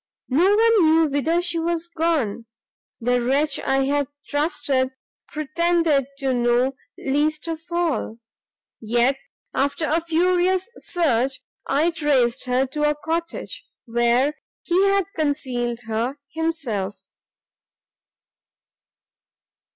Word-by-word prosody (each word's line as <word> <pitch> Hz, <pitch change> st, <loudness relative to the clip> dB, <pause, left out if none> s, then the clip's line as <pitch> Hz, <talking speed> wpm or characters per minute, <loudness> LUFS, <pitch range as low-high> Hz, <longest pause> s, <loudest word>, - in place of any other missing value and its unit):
no 350 Hz, +10 st, +4 dB
one 455 Hz, -1 st, +5 dB
knew 320 Hz, +1 st, +5 dB
whither 320 Hz, +5 st, +1 dB
she 345 Hz, -1 st, 0 dB
was 335 Hz, 0 st, -1 dB
gone; 315 Hz, -10 st, -1 dB, 0.5 s
the 245 Hz, +1 st, +1 dB
wretch 275 Hz, +5 st, +1 dB
I 270 Hz, 0 st, +1 dB
had 285 Hz, 0 st, +1 dB, 0.2 s
trusted 290 Hz, -3 st, 0 dB, 0.4 s
pretended 310 Hz, -2 st, +1 dB
to 270 Hz, -2 st, 0 dB
know 245 Hz, +2 st, +2 dB, 0.2 s
least 300 Hz, +4 st, 0 dB
of 325 Hz, -1 st, -4 dB
all; 335 Hz, -10 st, -1 dB, 0.6 s
yet, 240 Hz, +4 st, +1 dB, 0.3 s
after 280 Hz, +3 st, 0 dB
a 325 Hz, +3 st, +1 dB
furious 360 Hz, +4 st, +1 dB
search, 270 Hz, -7 st, 0 dB, 0.3 s
I 305 Hz, +5 st, +2 dB
traced 270 Hz, -7 st, +1 dB
her 255 Hz, +1 st, +2 dB
to 295 Hz, +3 st, 0 dB
a 300 Hz, -, 0 dB
cottage, 330 Hz, +3 st, -4 dB, 0.2 s
where 240 Hz, +4 st, +2 dB, 0.3 s
he 370 Hz, +2 st, +3 dB
had 395 Hz, -1 st, +2 dB
concealed 255 Hz, -6 st, -1 dB
her 230 Hz, +5 st, -2 dB, 0.2 s
himself! 270 Hz, -12 st, -2 dB
290 Hz, 105 wpm, -23 LUFS, 255-335 Hz, 0.6 s, one